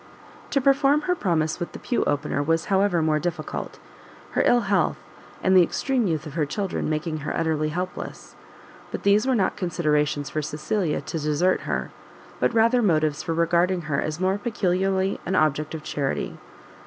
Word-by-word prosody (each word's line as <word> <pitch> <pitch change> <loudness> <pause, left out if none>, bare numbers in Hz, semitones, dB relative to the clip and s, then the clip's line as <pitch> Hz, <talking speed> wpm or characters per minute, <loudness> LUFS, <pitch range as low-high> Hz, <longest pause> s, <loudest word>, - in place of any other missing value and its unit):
To 280 - +2
perform 275 +2 +3
her 360 +4 +1
promise 165 - 0
with 175 - -5
the - - -6
Pew 245 - -1
Opener 145 0 0
was 165 +2 +1
however 190 -4 +3
more 155 -1 +2
difficult; 175 +2 -4 0.5
her - - +1
ill 245 - +5
health, - - +1 0.5
and 190 0 +4
the 185 - +8
extreme 250 +6 +1
youth 160 -2 -1
of 150 - -8
her 160 -1 0
children 195 +2 -2
making 155 +1 -2
her 150 -1 -3
utterly 155 -2 0
helpless: 180 +4 -6 0.5
but - - -6
these 205 +5 +4
were 260 - +3
not 195 -5 +1
considerations 150 -5 0
for 155 - -1
Cecilia 155 +3 -1
to 165 - -4
desert 155 +5 +1
her, - - -2 0.5
but - - +2
rather 230 +2 +4
motives 155 -7 +2
for 165 - -2
regarding 175 +2 +2
her 155 -3 -1
as 155 +1 -3
more 190 +2 +1
peculiarly 195 -3 0
an 190 - 0
object 155 -1 +1
of 155 - -7
charity. 140 -3 -3
170 Hz, 175 wpm, -24 LUFS, 155-195 Hz, 0.5 s, the